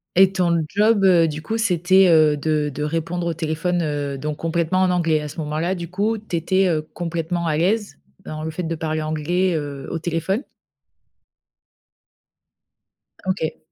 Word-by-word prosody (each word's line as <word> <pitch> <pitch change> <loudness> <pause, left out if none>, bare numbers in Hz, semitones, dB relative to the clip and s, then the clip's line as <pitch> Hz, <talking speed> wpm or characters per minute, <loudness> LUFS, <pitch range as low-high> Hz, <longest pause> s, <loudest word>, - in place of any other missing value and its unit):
Et 190 +1 +6
ton 170 -3 +1
job, 210 +2 +3
heu, 175 -3 +5
du 155 0 -4
coup, 220 +9 -3
c'était, 190 -2 +4
heu, 155 -3 +5
de 150 0 0
de 150 - -3
répondre 165 +3 -2
au 170 - 0
téléphone, 165 +3 -1
heu, 145 -2 -2
donc 150 +2 -4
complètement 165 +2 0
en 185 - +3
anglais, 165 -3 +1
à 150 - -5
ce 145 - -10
moment-là, 160 +4 -1
du 170 -2 -6
coup, 205 +5 0
tu 210 -4 -6
étais, 185 +3 +2
heu, 155 -3 +1
complètement 170 0 -3
à 155 -1 +1
l'aise 205 +6 0 0.3
dans 155 0 -6
le 160 - -3
fait 180 +3 -4
de 165 0 -2
parler 155 -1 -2
anglais, 160 +4 0
heu, 145 -3 -5
au 165 - -2
téléphone? 170 - -1 2.8
OK. 185 -4 -2
165 Hz, 170 wpm, -22 LUFS, 155-185 Hz, 2.8 s, Et